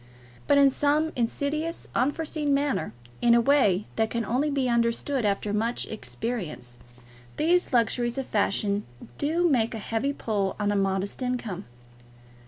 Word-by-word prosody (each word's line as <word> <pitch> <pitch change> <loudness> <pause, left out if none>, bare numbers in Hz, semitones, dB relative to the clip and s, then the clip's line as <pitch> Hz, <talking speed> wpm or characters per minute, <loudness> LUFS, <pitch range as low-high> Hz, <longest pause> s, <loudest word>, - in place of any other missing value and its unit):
But 285 - +5
in 280 -1 +6
some 295 +3 +1
insidious, 290 +7 -2
unforeseen 290 +2 +1
manner, 280 - 0 0.3
in 235 0 +5
a - - +6
way 225 -7 +3
that 220 -1 +2
can 235 -1 -2
only 265 +6 0
be 275 -3 0
understood 235 +2 +1
after 205 0 0
much 225 +3 -1
experience, 150 - -4 0.6
these 350 +3 +2
luxuries 240 0 +1
of 270 - -2
fashion 205 -1 0 0.4
do 335 +4 +2
make 235 -7 +1
a - - -3
heavy 225 +6 -1
pull 205 -7 -2
on 205 0 +1
a - - 0
modest 195 +3 -1
income. 235 -7 -3
235 Hz, 145 wpm, -26 LUFS, 210-285 Hz, 0.6 s, in